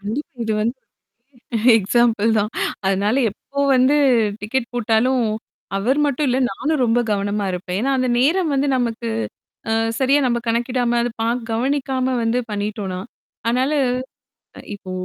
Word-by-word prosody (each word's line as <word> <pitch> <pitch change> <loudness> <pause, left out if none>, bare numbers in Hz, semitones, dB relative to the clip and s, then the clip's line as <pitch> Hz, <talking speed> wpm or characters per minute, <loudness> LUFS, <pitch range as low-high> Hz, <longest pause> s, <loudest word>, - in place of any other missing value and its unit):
கண்டிப்பா. 220 +10 -4
இது 220 - -1
வந்து 235 +4 -2 1.0
எக்ஸாம்பிள் 225 +1 +2
தான் 210 +1 0 0.4
அதனால 200 +4 +1 0.2
எப்போ 280 +6 -6 0.2
வந்து 260 +4 +4 0.4
டிக்கெட் 235 +3 -2
போட்டாலும், 245 +2 +2 0.5
அவர் 245 +9 +1
மட்டும் 285 +1 0
இல்ல, 250 +1 +1
நானும் 295 +7 -1
ரொம்ப 235 +1 +2
கவனமாக 200 -1 -1
இருப்பேன். 180 +1 -3
ஏன்னா, 275 +3 +1
அந்த 255 0 +1
நேரம் 320 +6 +2
வந்து, 280 +1 +1
அ, - - +2
நமக்கு 230 - -2 0.6
அ, - - +2 0.3
சரியா 275 +2 +3
நம்ம 240 -1 +1
கணக்கிடாம, 240 +1 0
அது 240 - -1
பாக் 235 +2 0
கவனிக்காம 260 +2 0
வந்து 230 +2 +1
பண்ணிட்டோன்னா. 205 -2 -3 0.5
அதனால 255 +5 +1 1.0
இப்போ 195 -2 -10
240 Hz, 135 wpm, -20 LUFS, 210-260 Hz, 1.0 s, வந்து